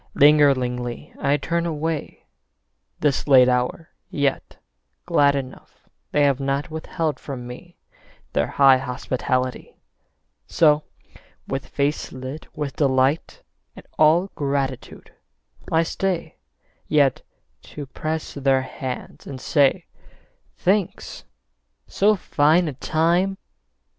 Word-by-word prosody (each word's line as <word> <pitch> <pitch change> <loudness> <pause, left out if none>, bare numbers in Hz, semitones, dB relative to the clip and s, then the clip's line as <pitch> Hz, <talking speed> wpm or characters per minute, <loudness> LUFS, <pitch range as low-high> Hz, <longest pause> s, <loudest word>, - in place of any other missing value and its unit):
Lingeringly 130 -5 +3
I 140 +1 +2
turn 170 +4 -1
away, 160 -1 -4 0.8
This 145 -2 +1
late 130 -3 +7
hour, 125 +6 -1 0.2
yet 140 -2 -2 0.5
glad 140 0 +3
enough 130 -2 -8 0.2
They 145 - +3
have 140 -2 +2
not 140 +3 -2
withheld 160 0 -3
from 130 -4 -7
me 125 +8 -11 0.6
Their 70 - +1
high 135 -2 +5
hospitality. 130 0 -3 0.7
So, 150 -2 +4 0.7
with 135 0 -4
face 145 +1 -2
lit 130 +4 -8
with 145 -3 -4
delight 135 +1 +1 0.3
And - - -13
all 165 +5 +4
gratitude, 140 -2 -3 0.6
I 160 0 +3
stay 180 0 -3 0.5
Yet 145 -3 +3 0.4
to 145 - -8
press 155 +4 -4
their 135 -1 +1
hands 130 -1 -7
and 135 -2 -7
say, 140 0 +2 0.7
"Thanks. 190 0 -1 0.6
So 210 +2 +3
fine 160 -1 +2
a 150 - -3
time 170 +7 +1
145 Hz, 105 wpm, -22 LUFS, 130-160 Hz, 0.8 s, late